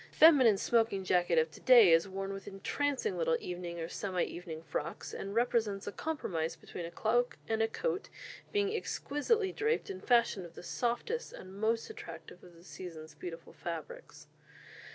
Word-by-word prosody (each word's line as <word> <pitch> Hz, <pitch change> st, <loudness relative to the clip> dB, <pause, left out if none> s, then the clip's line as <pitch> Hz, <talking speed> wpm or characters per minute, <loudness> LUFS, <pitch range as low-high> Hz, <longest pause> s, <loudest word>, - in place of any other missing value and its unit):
The -, -, -21 dB
feminine 265 Hz, -10 st, +8 dB
smoking 225 Hz, -3 st, +2 dB
jacket 175 Hz, -2 st, +2 dB
of 160 Hz, 0 st, +3 dB
to -, -, -13 dB
day 240 Hz, -8 st, +8 dB
is 165 Hz, +3 st, +4 dB
worn 195 Hz, +1 st, -4 dB
with 195 Hz, 0 st, -8 dB
entrancing 285 Hz, -, -1 dB
little -, -, +2 dB
evening 175 Hz, -, -5 dB
or 165 Hz, -, -3 dB
semi 185 Hz, 0 st, -2 dB
evening 165 Hz, -2 st, -6 dB
frocks, 155 Hz, 0 st, -4 dB
and 195 Hz, +1 st, -5 dB
represents 225 Hz, -4 st, +1 dB
a -, -, -3 dB
compromise 180 Hz, -, -2 dB
between 170 Hz, -2 st, -7 dB
a -, -, -9 dB
cloak 240 Hz, +5 st, +1 dB
and 225 Hz, 0 st, 0 dB
a 225 Hz, -, +4 dB
coat, -, -, -2 dB, 0.4 s
being 410 Hz, +1 st, +1 dB
exquisitely 395 Hz, -, 0 dB
draped 440 Hz, 0 st, 0 dB
and 380 Hz, -, -8 dB
fashioned 235 Hz, -7 st, +3 dB
of 170 Hz, -, -19 dB
the -, -, -10 dB
softest 240 Hz, -, -2 dB
and 185 Hz, 0 st, -10 dB
most 225 Hz, +1 st, +1 dB
attractive 165 Hz, +1 st, -10 dB
of 175 Hz, -1 st, -15 dB
the 165 Hz, -, -17 dB
season's 165 Hz, -4 st, -9 dB
beautiful 165 Hz, -2 st, -8 dB
fabrics." 485 Hz, -, -7 dB
200 Hz, 175 wpm, -32 LUFS, 175-270 Hz, 0.4 s, feminine